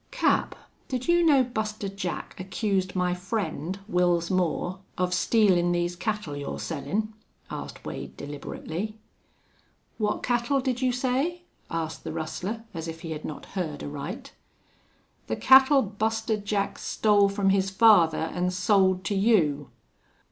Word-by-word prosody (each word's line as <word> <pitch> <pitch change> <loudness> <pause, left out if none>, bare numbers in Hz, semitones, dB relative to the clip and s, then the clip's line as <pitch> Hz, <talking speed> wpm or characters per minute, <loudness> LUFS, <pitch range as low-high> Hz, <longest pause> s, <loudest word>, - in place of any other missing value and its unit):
"Cap, - - +1 0.3
did 255 -1 -3
you 345 0 +4
know 285 -5 +5
Buster 215 -4 -3
Jack 195 -3 -5
accused 190 0 -1
my 180 -1 +1
friend, 185 -2 -3
Wils 175 -3 +2
Moore, 185 0 0 0.2
of 180 0 0
stealin' 180 -3 +3
these 175 0 0
cattle 210 -6 -3
you're 145 0 -4
sellin'?" 175 +8 -3 0.4
asked - - -7
Wade, 65 -1 -7
deliberately. 160 +8 -5 1.0
"What 210 -1 0
cattle 245 +3 +1
did 255 -1 -1
you 255 -1 +3
say?" 265 +8 -1 0.3
asked 160 -1 -4
the - - -4
rustler, 180 +7 -4
as 165 -1 -5
if 165 0 -7
he 165 -2 -6
had 155 -1 -5
not 155 - -6
heard 160 -7 -3
aright. 145 +4 -6 0.9
"The - - -1
cattle 265 +1 +6
Buster 220 +2 -1
Jack 200 -1 -2
stole 205 -2 +3
from 195 -1 +1
his 195 0 +2
father 190 -5 +5 0.2
an' 180 0 0
sold 185 0 +2
to - - -1
you." 175 - +2
195 Hz, 140 wpm, -26 LUFS, 175-220 Hz, 1.0 s, cattle